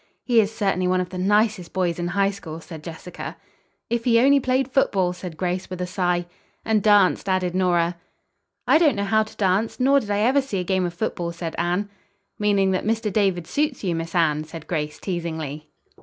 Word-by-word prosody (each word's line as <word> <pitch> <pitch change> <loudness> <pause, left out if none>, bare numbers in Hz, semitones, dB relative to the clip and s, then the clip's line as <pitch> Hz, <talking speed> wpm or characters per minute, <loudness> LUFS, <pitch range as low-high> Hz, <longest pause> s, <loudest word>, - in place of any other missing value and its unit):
"He 240 -2 +3
is 205 0 -2
certainly 195 -4 0
one 185 0 +2
of 180 -1 -2
the 180 0 -6
nicest 205 -2 +1
boys 180 -2 0
in 175 - -1
High 195 +3 +1
School," 165 -5 -8
said 160 -2 -10
Jessica. 170 +2 -8 0.5
"If 235 0 -1
he 230 -1 +4
only 280 +3 +5
played 260 0 +1
football!" 190 -9 +2
said 180 -3 -8
Grace, 180 +1 -2
with 185 -1 -6
a 180 - -1
sigh. 180 -1 0 0.4
"And 220 -1 +2
danced," 200 -2 +4
added 185 -2 0
Nora. 175 -2 +1 0.7
"I 315 - +6
don't 305 -7 +4
know 200 - -1
how 220 +2 +3
to 220 0 -6
dance, 200 +5 +1
nor 275 +2 +4
did 215 - -8
I 205 0 +1
ever 260 +6 +4
see 265 -7 -4
a - - -1
game 185 0 0
of 175 - -7
football," 175 -3 -2
said 170 -1 -5
Anne. 175 +4 0 0.5
"Meaning 200 -2 +2
that 185 - 0
Mr. 220 -1 -1
David 190 -5 +1
suits 290 - -1
you, 180 -3 0
Miss 165 +1 -4
Anne," 155 -3 +2
said 160 0 -10
Grace 150 -3 -3
teasingly. 160 -5 -5
185 Hz, 205 wpm, -23 LUFS, 175-215 Hz, 0.7 s, I